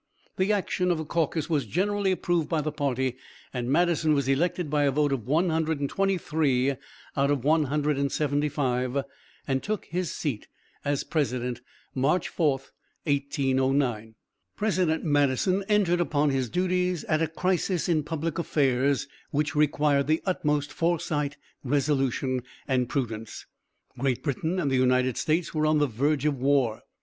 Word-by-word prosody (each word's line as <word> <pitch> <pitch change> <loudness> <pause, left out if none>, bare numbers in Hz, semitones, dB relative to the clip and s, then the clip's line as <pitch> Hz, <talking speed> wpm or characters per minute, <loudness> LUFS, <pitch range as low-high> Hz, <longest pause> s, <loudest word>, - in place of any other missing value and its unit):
The 190 +3 +2
action 185 -3 0
of 175 - +2
the 160 - -4
caucus 160 -1 -1
was 145 -8 0
generally 200 - +1
approved 175 -3 0
by 160 -3 +1
the 155 +1 -2
party, 130 -4 -1 0.4
and 125 -1 -3
Madison 165 -1 +3
was 140 -2 0
elected 165 +5 +1
by 145 0 +1
a - - +4
vote 145 0 +1
of 125 -4 -4
123 160 -3 +1 0.4
out 140 -1 +2
of 140 -4 0
175, 145 -3 +1 0.4
and 135 -1 0
took 215 0 -3
his 180 0 -2
seat 130 -9 -3 0.4
as 145 -1 0
president, 125 -6 -2 0.3
March 150 +7 +1
4, 160 -4 +2 0.5
1809. 135 -5 0 0.4
President 185 -6 +1
Madison 145 +6 +2
entered 195 -5 +3
upon 150 -3 +1
his 130 -3 -1
duties 180 0 0
at 155 0 0
a 160 - +2
crisis 180 +1 0
in 165 -3 +2
public 160 +2 -3
affairs 140 -3 +1 0.2
which 150 +1 -1
required 145 -1 +2
the 155 +1 +1
utmost 150 -6 0
foresight, 150 -4 -1 0.3
resolution 135 -2 0 0.3
and 125 -2 +1
prudence. 115 -5 -4 0.5
Great 130 -2 0
Britain 160 +5 -1
and 145 -6 0
the 130 - +2
United 125 -1 +2
States 165 +2 0
were 155 -1 +1
on 155 0 +3
the 150 - +3
verge 140 +4 0
of 145 -3 +1
war. 135 -5 +2
145 Hz, 140 wpm, -27 LUFS, 135-165 Hz, 0.5 s, a